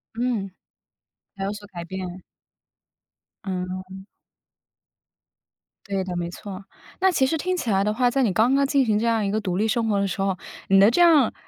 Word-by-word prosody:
嗯。 230 -5 -1 0.9
才 195 - -4
有 200 - -2
所 205 0 -9
改 170 -3 -7
变。 185 0 -6 1.2
嗯。 185 +1 -5 1.8
对 195 -2 -2
的， 180 -1 -5
没 175 0 -2
错。 195 +1 -8 0.4
那 380 0 +4
其 265 -6 +2
实 320 +4 0
听 365 +3 -1
起 240 - -3
来 195 0 +2
的 210 +1 0
话， 245 +1 +2
在 270 - +1
你 210 - +2
刚 230 +7 +3
刚 275 0 +3
进 275 -2 +2
行 210 -1 +2
这 230 - -1
样 225 -3 +1
一 195 - -1
个 215 +1 0
独 185 -3 -2
立 220 +2 +1
生 225 +1 0
活 200 -1 +2
的 200 - +1
时 195 +1 -3
候， 195 -2 0 0.3
你 195 0 +5
的 205 +4 +6
这 350 - +2
样 310 -8 +5
205 Hz, 210 characters per minute, -24 LUFS, 190-245 Hz, 1.8 s, 的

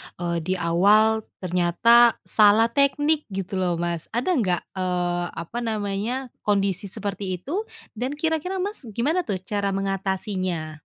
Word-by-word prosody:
eee, 170 -1 -2
di 185 +4 -2
awal 205 +6 +3 0.2
ternyata 185 +7 +4
salah 220 +2 +4
teknik 290 +3 +2
gitu 190 -1 -4
loh 175 -2 +1
Mas 170 -1 -3
ada 255 +10 +1
nggak, 190 - +1 0.2
eee, 175 -1 -1
apa 170 +10 -6
namanya 225 +3 -3 0.2
kondisi 200 -1 +1
seperti 195 -1 -3
itu 355 - -4 0.3
dan 260 +4 -2
kira-kira 325 +4 -1
Mas 410 +2 -1 0.2
gimana 315 +8 0
tuh 190 -2 -3
cara 200 -1 -2
mengatasinya? 190 -4 -2
200 Hz, 135 wpm, -24 LUFS, 180-240 Hz, 0.3 s, ternyata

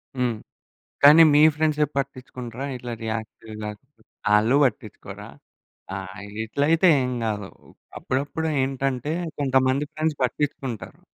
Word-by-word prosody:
హ్మ్. 125 -3 0 0.7
కానీ 150 +3 +9
మీ 145 - +6
ఫ్రెండ్సే 150 -1 +2
పట్టిచ్చుకుంటరా 130 -2 -5
ఇట్లా 125 -1 -6
రియాక్టు 110 0 -5
గాక 105 0 -5 0.6
ఆళ్ళు 110 +5 +4
బట్టించుకోరా? 110 -5 -4 0.7
ఆ! - - -3 0.3
ఇగిట్లయితే 140 - +1 0.2
ఏం 125 - -2
గాదు. 105 -3 -3 0.5
అప్పుడప్పుడు 145 +5 -2
ఏంటంటే, 135 +1 -2 0.3
కొంతమంది 130 0 +2
ఫ్రెండ్స్ 155 -1 -1
పట్టిచ్చుకుంటారు. 130 -3 -3
130 Hz, 100 wpm, -24 LUFS, 115-145 Hz, 0.7 s, కానీ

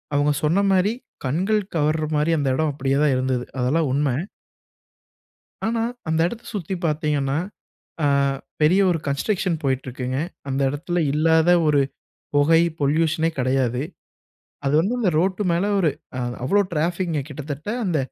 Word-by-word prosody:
அவங்க 145 +1 +3
சொன்ன 175 +7 +3
மாரி 190 +4 +3 0.3
கண்கள் 190 +11 +1
கவர்ற 155 0 +1
மாரி 150 +3 +2
அந்த 140 -2 0
இடம் 155 0 +1
அப்படியே 135 0 0
தான் 145 -3 +3
இருந்தது. 130 -1 0 0.2
அதெல்லாம் 140 +4 +1
உண்ம. 145 +1 +1 1.6
ஆனா, 225 0 0 0.3
அந்த 160 0 +1
இடத்த 235 +6 -6
சுத்தி 190 -1 -3
பார்த்தீங்கன்னா, 150 -2 0 0.7
அ - - +4 0.6
பெரிய 180 +6 +5
ஒரு 170 - +1
கன்ஸ்ட்ரக்ஷன் 175 +4 0
போயிட்டிருக்குங்க. 130 -1 -2 0.3
அந்த 135 +1 -1
இடத்துல 165 +5 -2
இல்லாத 160 +2 +3 0.2
ஒரு 145 -2 +4 0.5
பொகை, 160 +3 +5 0.2
பொல்யூஷனே 160 +3 +2
கெடையாது. 130 -1 +1 0.8
அது 135 - +1
வந்து 195 +9 +1
அந்த 210 -6 +2
ரோட்டு 185 +4 +1
மேல 170 +3 +1
ஒரு 170 -5 +3 0.3
அ - - -2 0.2
அவ்வளோ 200 +10 +3
ட்ராஃபிக்குங்க. 170 0 0
கிட்டத்தட்ட 145 +3 -6 0.2
அந்த 175 -4 +1
155 Hz, 135 wpm, -23 LUFS, 140-175 Hz, 1.6 s, பெரிய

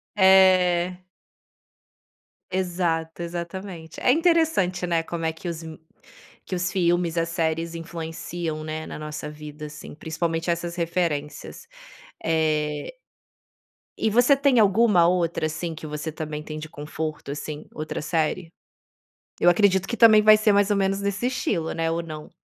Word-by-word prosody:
É. 185 -2 +5 1.5
Exato, 175 -3 -1
exatamente. 170 0 -6
É - - +4
interessante, 320 - +2
né, 165 -1 +1
como 165 0 -4
é 160 - +1
que 160 +3 -9
os 170 -1 -4
me 160 -1 -9 0.7
que 185 - -3
os 180 0 -1
filmes, 175 -2 +1
as 165 0 -1
séries 165 0 -1
influenciam, 165 -1 -5
né, 155 0 -5
na - - -7
nossa 150 0 -6
vida, 150 0 -9
assim, 150 0 -10
principalmente 165 +2 -3
essas 170 0 -2
referências. 170 - -3 0.6
Eh 155 - 0 1.1
E 220 - +1
você 245 +6 +5
tem 275 -3 +3
alguma 205 -4 +5
outra, 170 -3 0
assim, 160 +1 -4
que 155 - -9
você 150 +1 -4
também 155 -1 -5
tem 155 0 -7
de 155 0 -7
conforto, 150 0 -5
assim, 150 +1 -6
outra 155 0 -5
série? 165 +2 -1 0.9
Eu 175 - +6
acredito 190 +1 +3
que 235 - -3
também 220 -2 +7
vai 215 0 +7
ser 215 0 +3
mais 200 0 +3
ou 205 - +2
menos 195 0 0
nesse 200 +4 -1
estilo, 205 -10 -1
né, 165 0 -1
ou 165 +1 -1
não? 155 -2 -8
170 Hz, 145 wpm, -24 LUFS, 160-190 Hz, 1.5 s, também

